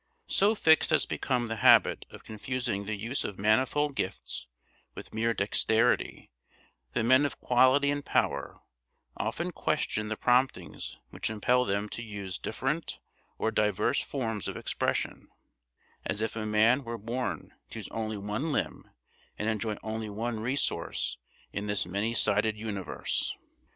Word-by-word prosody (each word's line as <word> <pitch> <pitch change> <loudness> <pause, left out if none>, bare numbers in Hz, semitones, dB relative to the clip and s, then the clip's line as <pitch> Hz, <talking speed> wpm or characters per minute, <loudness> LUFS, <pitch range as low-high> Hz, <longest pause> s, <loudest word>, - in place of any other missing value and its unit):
So 205 +3 +3
fixed 160 -6 +5
has - - +3
become 125 -3 -1
the 115 0 -3
habit - - +5
of - - -12
confusing 110 -2 -3
the 110 +1 -2
use 115 +7 -2
of 100 - -5
manifold 130 +8 +2
gifts 95 - -4 0.5
with - - -10
mere 115 +1 +1
dexterity 110 +2 +1 0.6
that 120 - +1
men 130 +4 +6
of 145 -4 -2
quality 130 +3 +4
and 145 0 -2
power - - 0 0.5
often - - -2
question 105 0 -1
the 110 0 -3
promptings 125 - +1
which - - -2
impel 125 +4 +2
them 100 +1 0
to 115 - -5
use 100 -4 -6
different 150 +5 -2 0.4
or 110 - 0
diverse 105 +4 +2
forms 115 -7 -3
of - - -4
expression; - - -2 0.8
as 105 - -2
if 110 +1 -2
a 110 -1 -3
man 110 +5 +4
were 115 -1 -4
born 120 +4 -4 0.2
to - - -8
use - - -6
only 110 -1 -3
one 105 +10 -2
limb - - -2 0.5
and 105 - -1
enjoy 110 -1 -1
only 110 0 -3
one 110 +2 -3
resource 125 +5 -1 0.3
in 100 +1 -3
this 105 -1 +1
many 100 +6 -1
sided 105 0 +2
universe! 105 -4 -2
110 Hz, 145 wpm, -29 LUFS, 105-125 Hz, 0.8 s, men